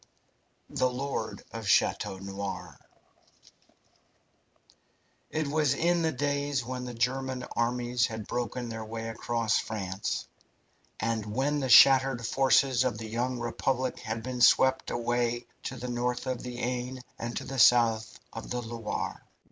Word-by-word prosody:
THE 130 Hz, -, +2 dB
LORD 135 Hz, +3 st, -4 dB
OF 115 Hz, -2 st, -6 dB
CHATEAU 95 Hz, +1 st, +2 dB
NOIR 100 Hz, 0 st, -5 dB, 2.5 s
It 155 Hz, 0 st, -1 dB
was 145 Hz, -2 st, +2 dB
in 170 Hz, +3 st, +2 dB
the 160 Hz, -1 st, +1 dB
days 140 Hz, -2 st, -1 dB
when 125 Hz, 0 st, -4 dB
the 125 Hz, -1 st, -6 dB
German 130 Hz, +2 st, -1 dB
armies 120 Hz, 0 st, +1 dB
had 110 Hz, -2 st, -6 dB
broken 120 Hz, +1 st, -3 dB
their 115 Hz, -1 st, -5 dB
way 115 Hz, +1 st, -5 dB
across 115 Hz, -1 st, 0 dB
France, 100 Hz, -3 st, -3 dB, 0.7 s
and 115 Hz, -1 st, -1 dB
when 135 Hz, +7 st, 0 dB
the 135 Hz, -2 st, -2 dB
shattered 130 Hz, -1 st, +7 dB
forces 135 Hz, 0 st, +3 dB
of 125 Hz, -4 st, -1 dB
the 110 Hz, +1 st, -6 dB
young 125 Hz, +3 st, -1 dB
Republic 130 Hz, +2 st, -1 dB
had 110 Hz, -1 st, -4 dB
been 125 Hz, -1 st, -4 dB
swept 130 Hz, +2 st, +5 dB
away 120 Hz, 0 st, -1 dB, 0.2 s
to -, -, -3 dB
the 125 Hz, -, -6 dB
north 125 Hz, +1 st, -2 dB
of 130 Hz, -2 st, -2 dB
the 125 Hz, -1 st, -6 dB
Aisne 125 Hz, +1 st, -3 dB, 0.2 s
and 120 Hz, 0 st, -4 dB
to -, -, -3 dB
the 135 Hz, -1 st, -5 dB
south 115 Hz, -2 st, +4 dB
of 115 Hz, -, -7 dB
the 125 Hz, -, -2 dB
Loire. 115 Hz, -1 st, -4 dB
120 Hz, 140 wpm, -29 LUFS, 115-130 Hz, 2.5 s, shattered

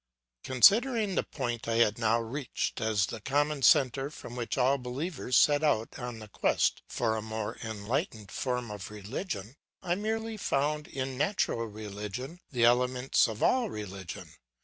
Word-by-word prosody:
"Considering 215 Hz, -, +5 dB
the -, -, +2 dB
point 120 Hz, -5 st, -4 dB
I 115 Hz, -, 0 dB
had 115 Hz, -1 st, +3 dB
now 115 Hz, 0 st, +3 dB
reached 120 Hz, +2 st, -3 dB
as 110 Hz, -2 st, +2 dB
the 115 Hz, 0 st, -7 dB
common 145 Hz, +3 st, 0 dB
centre 135 Hz, +1 st, +4 dB
from 120 Hz, -5 st, -10 dB
which 125 Hz, +5 st, -3 dB
all 135 Hz, +2 st, +3 dB
believers 130 Hz, +2 st, -1 dB
set 145 Hz, 0 st, +5 dB
out 115 Hz, -7 st, +1 dB
on 120 Hz, -2 st, -5 dB
the 110 Hz, -1 st, -9 dB
quest 105 Hz, -, +1 dB
for 115 Hz, -2 st, 0 dB
a 110 Hz, -, -2 dB
more 110 Hz, 0 st, -4 dB
enlightened 110 Hz, -, -3 dB
form 125 Hz, -3 st, -2 dB
of 100 Hz, -3 st, -7 dB
religion, 105 Hz, -, -5 dB, 0.3 s
I 175 Hz, -2 st, +1 dB
merely 220 Hz, +3 st, -2 dB
found 150 Hz, -3 st, 0 dB
in 130 Hz, -1 st, -4 dB
natural 145 Hz, -, 0 dB
religion 105 Hz, -, -6 dB
the 120 Hz, -4 st, 0 dB
elements 125 Hz, +2 st, +3 dB
of 110 Hz, -1 st, -4 dB
all 250 Hz, -4 st, +3 dB
religion. 95 Hz, -, -7 dB
125 Hz, 155 wpm, -30 LUFS, 110-145 Hz, 0.3 s, Considering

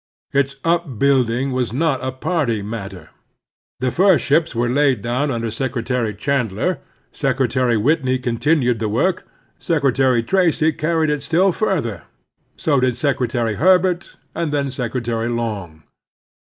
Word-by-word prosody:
Its 140 Hz, 0 st, +1 dB
upbuilding 135 Hz, -6 st, +1 dB
was 125 Hz, -3 st, -1 dB
not 135 Hz, 0 st, 0 dB
a 130 Hz, -, -2 dB
party 130 Hz, -, -1 dB
matter. 95 Hz, -5 st, -7 dB, 0.7 s
The 130 Hz, -1 st, +1 dB
first 190 Hz, +2 st, +3 dB
ships 155 Hz, 0 st, +2 dB
were 120 Hz, +1 st, +1 dB
laid 130 Hz, -3 st, +2 dB
down 125 Hz, +5 st, 0 dB
under 115 Hz, -3 st, -2 dB
Secretary 125 Hz, -3 st, -2 dB
Chandler; 130 Hz, -, -1 dB, 0.3 s
Secretary 130 Hz, -3 st, +1 dB
Whitney 130 Hz, +2 st, +1 dB
continued 125 Hz, 0 st, +1 dB
the 110 Hz, -2 st, -1 dB
work; 170 Hz, -, 0 dB, 0.3 s
Secretary 135 Hz, -6 st, +2 dB
Tracy 165 Hz, 0 st, +2 dB
carried 155 Hz, 0 st, 0 dB
it 150 Hz, -1 st, -1 dB
still 180 Hz, +6 st, +2 dB
further; 160 Hz, -, -2 dB, 0.5 s
so 145 Hz, -4 st, +1 dB
did 125 Hz, -1 st, +1 dB
Secretary 125 Hz, -4 st, 0 dB
Herbert, 180 Hz, -, +2 dB, 0.2 s
and 165 Hz, -2 st, -2 dB
then 140 Hz, -2 st, -1 dB
Secretary 120 Hz, -2 st, -2 dB
Long. 105 Hz, -10 st, -4 dB
130 Hz, 130 wpm, -20 LUFS, 115-155 Hz, 0.7 s, first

